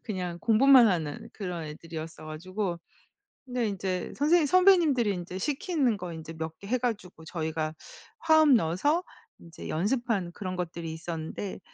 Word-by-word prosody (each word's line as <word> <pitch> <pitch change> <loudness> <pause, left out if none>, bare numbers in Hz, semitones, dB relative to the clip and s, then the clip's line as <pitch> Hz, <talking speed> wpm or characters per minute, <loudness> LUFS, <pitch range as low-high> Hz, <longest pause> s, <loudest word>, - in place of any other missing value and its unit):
그냥 180 -5 -4
공부만 245 +4 +6
하는 160 -7 -1
그런 180 -5 -5
애들이었어 160 +1 -8
가지고 175 +4 -4 0.7
근데 245 -3 -1
인제 190 -2 -3
선생님 310 +3 +4
선배님들이 320 - +4
인제 180 +1 -6
시키는 280 - 0
거 180 -3 -6
인제 160 0 -8
몇 160 0 -6
개 200 - -11
해 250 +5 +1
가지고 210 -9 -4
저희가 160 -1 -3 0.4
화음 315 -3 +5
넣어서 235 - +1 0.3
인제 170 0 -10
연습한 205 0 -1
그런 185 -1 -5
것들이 170 -2 -4
있었는데 165 +4 -5
185 Hz, 330 characters per minute, -28 LUFS, 165-250 Hz, 0.7 s, 공부만